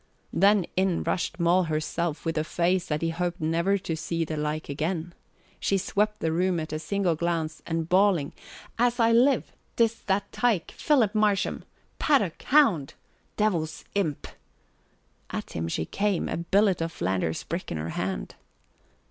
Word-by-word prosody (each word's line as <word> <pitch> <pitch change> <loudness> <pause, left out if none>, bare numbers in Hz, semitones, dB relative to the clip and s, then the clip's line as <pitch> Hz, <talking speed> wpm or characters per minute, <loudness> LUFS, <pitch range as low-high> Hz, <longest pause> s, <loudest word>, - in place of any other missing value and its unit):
Then 200 -2 +4
in 185 -2 +1
rushed 170 -1 -2
Moll 175 +2 +3
herself 160 +1 -2
with 165 - -1
such 155 - +1
a 155 - -7
face 180 +1 +1
that 150 +1 -2
he 165 - +1
hoped 175 +2 -2
never 170 +5 +1
to 180 -4 -3
see 165 +1 -2
the 155 - -4
like 150 +1 -2
again. 160 +4 -3 0.5
She 195 - +1
swept 210 +3 0
the 160 - +1
room 180 +1 +1
at 155 -1 -5
a 155 - -2
single 195 +1 0
glance 160 -1 -2
and 165 -1 -1
bawling, 185 -4 +3 0.5
"As 245 +1 +2
I 230 0 +4
live, 250 +3 +3 0.2
't 235 - +6
is 230 0 -1
that 195 0 0
tike, 230 -8 +1
Philip 250 -9 +2
Marsham! 210 -3 +1 0.3
Paddock! 210 - +2
Hound! 225 - +3 0.4
Devil's 170 -7 0
imp!" 170 -8 -1 1.0
at - - -5
him 80 0 -3
she 80 -1 -2
came, 200 - 0
a - - -2
billet 190 +2 +2
of 165 0 -1
Flanders 90 - -1
brick 170 +3 -5
in 80 - -2
her 80 +2 -4
hand. - - -3
175 Hz, 165 wpm, -27 LUFS, 160-200 Hz, 1.0 s, t